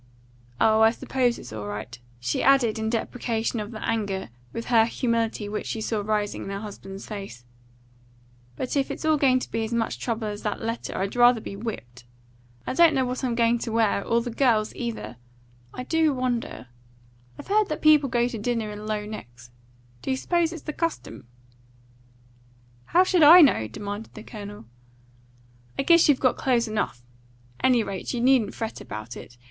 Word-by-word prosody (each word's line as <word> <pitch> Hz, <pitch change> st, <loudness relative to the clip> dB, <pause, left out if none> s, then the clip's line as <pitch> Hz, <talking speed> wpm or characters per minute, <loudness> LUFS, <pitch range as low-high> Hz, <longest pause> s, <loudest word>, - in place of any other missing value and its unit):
Oh, 220 Hz, 0 st, +4 dB
I 220 Hz, -, +7 dB
suppose 245 Hz, +1 st, 0 dB
it's 120 Hz, -, -10 dB
all 105 Hz, -1 st, -5 dB
right," 105 Hz, +4 st, -6 dB, 0.2 s
she 125 Hz, +1 st, -1 dB
added 250 Hz, -5 st, +3 dB
in 220 Hz, 0 st, -1 dB
deprecation 230 Hz, 0 st, -2 dB
of 210 Hz, -1 st, -5 dB
the 220 Hz, -2 st, -6 dB
anger 200 Hz, -, -2 dB, 0.2 s
with 230 Hz, -, -5 dB
her 230 Hz, -2 st, +4 dB
humility 230 Hz, -3 st, -1 dB
which 210 Hz, +1 st, -4 dB
she 225 Hz, -, -3 dB
saw 220 Hz, -1 st, -1 dB
rising 210 Hz, 0 st, -1 dB
in -, -, -6 dB
her 195 Hz, 0 st, -4 dB
husband's 200 Hz, -2 st, -9 dB
face; 195 Hz, -, -8 dB, 1.1 s
"but 255 Hz, -, -3 dB
if 275 Hz, -1 st, +1 dB
it's -, -, -5 dB
all 310 Hz, -1 st, +4 dB
going 265 Hz, -3 st, +4 dB
to -, -, -7 dB
be 225 Hz, -, -1 dB
as 220 Hz, -, -4 dB
much 235 Hz, -1 st, -1 dB
trouble 230 Hz, -2 st, -2 dB
as 205 Hz, 0 st, -5 dB
that 210 Hz, -, -3 dB
letter, 230 Hz, +1 st, -4 dB
I'd 195 Hz, +3 st, -2 dB
rather 245 Hz, -1 st, +6 dB
be 200 Hz, -, -7 dB
whipped. 130 Hz, -, -7 dB, 0.6 s
I -, -, -2 dB
don't 325 Hz, +1 st, +5 dB
know 260 Hz, -1 st, +2 dB
what 250 Hz, +2 st, -4 dB
I'm 245 Hz, -2 st, 0 dB
going 235 Hz, 0 st, +2 dB
to 230 Hz, -, -4 dB
wear; 220 Hz, -3 st, +2 dB
or 235 Hz, 0 st, +1 dB
the 240 Hz, +1 st, -5 dB
girls 225 Hz, -3 st, +2 dB
either. 230 Hz, -, -5 dB, 0.5 s
I 250 Hz, -, -6 dB
do 315 Hz, 0 st, +2 dB
wonder 245 Hz, -, -3 dB, 0.7 s
I've -, -, -11 dB
heard 425 Hz, 0 st, +3 dB
that 305 Hz, -, -4 dB
people 300 Hz, -3 st, +5 dB
go 240 Hz, -1 st, +2 dB
to 240 Hz, -3 st, -5 dB
dinner 225 Hz, -1 st, -2 dB
in 210 Hz, +1 st, -8 dB
low 210 Hz, -1 st, -2 dB
necks. 120 Hz, -, -10 dB, 0.5 s
Do -, -, -5 dB
you 260 Hz, -, +1 dB
suppose 340 Hz, +3 st, +1 dB
it's 335 Hz, -3 st, -8 dB
the 305 Hz, -, -5 dB
custom?" 330 Hz, -, -4 dB, 1.6 s
"How 355 Hz, +3 st, +4 dB
should 370 Hz, -2 st, +2 dB
I 330 Hz, +4 st, +10 dB
know?" 245 Hz, -, +4 dB
demanded 205 Hz, -, -7 dB
the 215 Hz, -, -9 dB
Colonel. 205 Hz, -, -9 dB, 1.1 s
"I -, -, 0 dB
guess 335 Hz, +1 st, +5 dB
you've 280 Hz, -, +4 dB
got 255 Hz, -, +2 dB
clothes 240 Hz, -3 st, +1 dB
enough. 210 Hz, -, -3 dB, 0.6 s
Any 250 Hz, -3 st, +4 dB
rate, 195 Hz, +4 st, -4 dB
you -, -, -2 dB
needn't 250 Hz, -4 st, +3 dB
fret 225 Hz, -1 st, -5 dB
about 110 Hz, +3 st, -7 dB
it. 120 Hz, -, -11 dB
230 Hz, 185 wpm, -25 LUFS, 205-255 Hz, 1.6 s, I